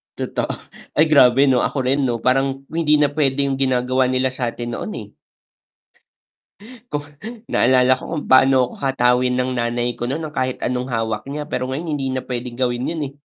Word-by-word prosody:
Totoo -, -, -3 dB, 0.5 s
ay 155 Hz, -, +5 dB
grabe 135 Hz, -2 st, +6 dB
'no 125 Hz, -2 st, +3 dB
ako 140 Hz, -, -1 dB
rin 135 Hz, +2 st, +1 dB
'no 115 Hz, -2 st, -2 dB
parang 135 Hz, +1 st, +1 dB
hindi 160 Hz, -2 st, +2 dB
na 145 Hz, -1 st, +3 dB
pwedeng 140 Hz, -2 st, 0 dB
ginagawa 130 Hz, 0 st, +1 dB
nila 130 Hz, 0 st, +1 dB
sa 125 Hz, -2 st, -2 dB
atin 120 Hz, 0 st, -5 dB
noon 215 Hz, -, -5 dB
eh. -, -, -7 dB, 1.8 s
Kung 145 Hz, 0 st, -3 dB, 0.5 s
naalala 130 Hz, +1 st, +4 dB
ko -, -, -13 dB
kung 155 Hz, -3 st, -3 dB
paano 130 Hz, +1 st, +6 dB
ako -, -, -11 dB
hatawin 125 Hz, -1 st, +2 dB
ng 130 Hz, 0 st, 0 dB
nanay 120 Hz, +1 st, -1 dB
ko -, -, -5 dB
nun 155 Hz, +4 st, -3 dB
ng 150 Hz, -, -8 dB
kahit 130 Hz, 0 st, -1 dB
anong 125 Hz, +1 st, -2 dB
hawak 110 Hz, -1 st, -2 dB
niya 150 Hz, +1 st, -4 dB
pero -, -, -1 dB
ngayon 155 Hz, +5 st, -4 dB
hindi 135 Hz, -2 st, -2 dB
na 130 Hz, 0 st, -3 dB
pwedeng 125 Hz, -1 st, -5 dB
gawin 125 Hz, +1 st, -1 dB
yun 165 Hz, -2 st, -4 dB
eh. 135 Hz, -, -12 dB
130 Hz, 185 wpm, -20 LUFS, 125-140 Hz, 1.8 s, grabe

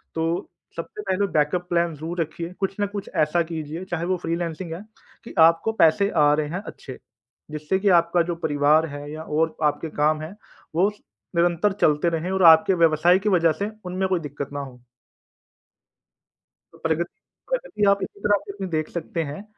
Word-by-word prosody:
तो 165 Hz, +1 st, -1 dB, 0.3 s
सबसे 165 Hz, +5 st, -6 dB
पहले 200 Hz, 0 st, 0 dB
बैकअप 155 Hz, +4 st, +1 dB
प्लान 170 Hz, -1 st, +1 dB
ज़रूर 165 Hz, +4 st, -4 dB
रखिए 165 Hz, +2 st, -5 dB
कुछ 195 Hz, -1 st, -1 dB
ना 205 Hz, -, +2 dB
कुछ 200 Hz, 0 st, -6 dB
ऐसा 155 Hz, +3 st, +2 dB
कीजिए 160 Hz, +1 st, -6 dB
चाहे 170 Hz, -1 st, -1 dB
वो 185 Hz, +1 st, 0 dB
फ्रीलांसिंग 165 Hz, 0 st, -4 dB
है 170 Hz, -, -7 dB, 0.4 s
कि -, -, -10 dB
आपको 165 Hz, +6 st, +5 dB
पैसे 200 Hz, +5 st, +4 dB
आ 145 Hz, 0 st, +5 dB
रहे 150 Hz, 0 st, 0 dB
हैं 180 Hz, +4 st, -4 dB
अच्छे, 130 Hz, -, -9 dB, 0.5 s
जिससे 155 Hz, +5 st, -1 dB
की 200 Hz, +1 st, +2 dB
आपका 170 Hz, +1 st, +1 dB
जो -, -, -2 dB
परिवार 145 Hz, +2 st, +3 dB
है 145 Hz, 0 st, -8 dB
या 155 Hz, +1 st, -6 dB
और 160 Hz, +1 st, 0 dB
आपके 150 Hz, +2 st, 0 dB
काम 155 Hz, +1 st, +2 dB
हैं 160 Hz, +6 st, -7 dB, 0.4 s
वो 185 Hz, +4 st, +4 dB
उस 210 Hz, 0 st, -7 dB, 0.4 s
निरंतर 175 Hz, +4 st, +2 dB
चलते 150 Hz, +3 st, +3 dB
रहें 165 Hz, +2 st, -2 dB
और 190 Hz, -1 st, +1 dB
आपके 160 Hz, +4 st, +2 dB
व्यवसाय 165 Hz, +4 st, +4 dB
की 210 Hz, +2 st, 0 dB
वजह 170 Hz, -4 st, +4 dB
से 205 Hz, -, -1 dB, 0.2 s
उनमें 185 Hz, +1 st, -1 dB
कोई 185 Hz, -2 st, +1 dB
दिक्कत 145 Hz, -2 st, -6 dB
ना 145 Hz, -, -3 dB
हो। 130 Hz, -3 st, -9 dB, 2.0 s
प्रगति, -, -, 0 dB, 0.4 s
प्रगति -, -, -2 dB
आप 200 Hz, 0 st, +3 dB
इसी -, -, -7 dB
तरह 205 Hz, -1 st, +2 dB
से 195 Hz, -1 st, -6 dB
देख 155 Hz, -3 st, -2 dB
सकते 165 Hz, -1 st, -3 dB
हैं। 150 Hz, +6 st, -7 dB
165 Hz, 180 wpm, -23 LUFS, 155-185 Hz, 2.0 s, आपको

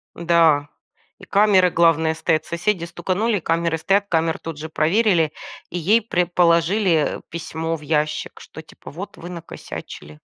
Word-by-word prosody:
Да, 165 Hz, -4 st, +3 dB, 0.5 s
и -, -, -17 dB
камеры, 195 Hz, -3 st, +4 dB
главное, 160 Hz, -1 st, +3 dB
стоят, 160 Hz, 0 st, 0 dB
соседи 170 Hz, 0 st, -1 dB
стуканули, 195 Hz, +5 st, -1 dB
камеры 165 Hz, 0 st, 0 dB
стоят, 200 Hz, +4 st, +2 dB
камеры 165 Hz, -1 st, +1 dB
тут 165 Hz, -2 st, -7 dB
же 160 Hz, +1 st, -6 dB
проверили, 165 Hz, -1 st, +2 dB, 0.4 s
и 175 Hz, -, -3 dB
ей 215 Hz, +8 st, +3 dB
прям 180 Hz, -5 st, 0 dB
положили, 170 Hz, 0 st, +2 dB
э, -, -, -15 dB
письмо 165 Hz, 0 st, -4 dB
в 155 Hz, -, -10 dB
ящик, 150 Hz, 0 st, -2 dB
что, 160 Hz, -, -11 dB
типа, 155 Hz, -, -14 dB
вот 190 Hz, +6 st, -8 dB
вы 175 Hz, -, -9 dB
накосячили. 75 Hz, -, -9 dB
170 Hz, 150 wpm, -21 LUFS, 160-185 Hz, 0.5 s, камеры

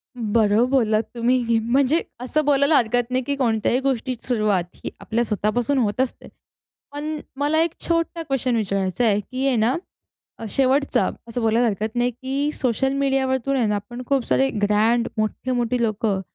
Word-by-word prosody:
बरोबर 225 Hz, 0 st, +2 dB
बोललात 225 Hz, -5 st, +2 dB
तुम्ही, 235 Hz, -1 st, +2 dB
म्हणजे 265 Hz, +7 st, +2 dB, 0.2 s
असं 290 Hz, +5 st, -1 dB
बोलायला 280 Hz, +1 st, +3 dB
हरकत 245 Hz, +1 st, +1 dB
नाही, 255 Hz, +1 st, 0 dB
की 280 Hz, +3 st, -2 dB
कोणत्याही 235 Hz, -2 st, +1 dB
गोष्टीची 260 Hz, -2 st, -2 dB
सुरुवात 215 Hz, -7 st, +1 dB
ही -, -, -6 dB
आपल्या 235 Hz, +2 st, -1 dB
स्वतःपासून 230 Hz, +5 st, 0 dB
होत 230 Hz, -1 st, +1 dB
असते. 260 Hz, -, -4 dB, 0.6 s
पण 300 Hz, +2 st, -4 dB, 0.2 s
मला 295 Hz, +3 st, +1 dB
1 335 Hz, 0 st, 0 dB
छोटा 335 Hz, 0 st, 0 dB
क्वेशन 265 Hz, -4 st, -1 dB
विचारायचा 195 Hz, +1 st, 0 dB
आहे. 205 Hz, -2 st, +3 dB
की 255 Hz, +6 st, -4 dB
आहे 265 Hz, -, +2 dB
ना 230 Hz, +3 st, +2 dB, 0.8 s
शेवटचा 270 Hz, +1 st, +2 dB, 0.2 s
असं 230 Hz, +1 st, -3 dB
बोलायला 225 Hz, +2 st, +3 dB
हरकत 215 Hz, +1 st, -3 dB
नाही 245 Hz, +1 st, +2 dB
की 270 Hz, +4 st, -2 dB
सोशल 265 Hz, +1 st, 0 dB
मीडियावरतून 270 Hz, -1 st, 0 dB
आहे 245 Hz, -4 st, +2 dB
ना 210 Hz, -1 st, +1 dB
पण 240 Hz, +1 st, -6 dB
खूप 270 Hz, -2 st, +1 dB
सारे 270 Hz, -, +2 dB
ग्रँड 220 Hz, +3 st, +2 dB
मोठे-मोठे 240 Hz, +2 st, -1 dB
लोकं 215 Hz, -3 st, 0 dB
245 Hz, 160 wpm, -22 LUFS, 220-270 Hz, 0.8 s, बोलायला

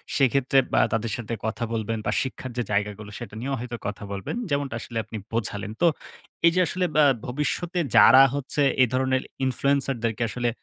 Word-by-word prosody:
সেক্ষেত্রে 135 Hz, 0 st, +2 dB, 0.2 s
বা -, -, +5 dB
তাদের 110 Hz, 0 st, -1 dB
সাথে 120 Hz, -1 st, -5 dB
কথা 110 Hz, +1 st, -2 dB
বলবেন 115 Hz, 0 st, -2 dB
বা -, -, +1 dB
শিক্ষার 130 Hz, -1 st, -5 dB
যে 120 Hz, -, +1 dB
জায়গাগুলো 105 Hz, 0 st, -2 dB
সেটা 120 Hz, -, -8 dB
নিয়েও 135 Hz, +3 st, -2 dB
হয়তো 120 Hz, 0 st, -5 dB
কথা 105 Hz, 0 st, -5 dB
বলবেন। 100 Hz, -, -4 dB
যেমনটা 140 Hz, -1 st, -1 dB
আসলে 115 Hz, -, -7 dB
আপনি 110 Hz, -, -7 dB, 0.2 s
বোঝালেন। 105 Hz, -2 st, -2 dB
তো 175 Hz, -, +6 dB, 0.6 s
এইযে 170 Hz, +2 st, +3 dB
আসলে 185 Hz, 0 st, -1 dB
বা 155 Hz, -, +6 dB, 0.2 s
ভবিষ্যতে 150 Hz, +7 st, -2 dB, 0.2 s
যারা 130 Hz, +3 st, +9 dB
হচ্ছে 145 Hz, +1 st, -2 dB, 0.2 s
এই 130 Hz, -, +6 dB
ধরনের 130 Hz, 0 st, +1 dB, 0.2 s
Influencer 135 Hz, +1 st, +1 dB
দেরকে 115 Hz, 0 st, 0 dB
আসলে 120 Hz, +2 st, -1 dB
125 Hz, 175 wpm, -25 LUFS, 115-140 Hz, 0.6 s, যারা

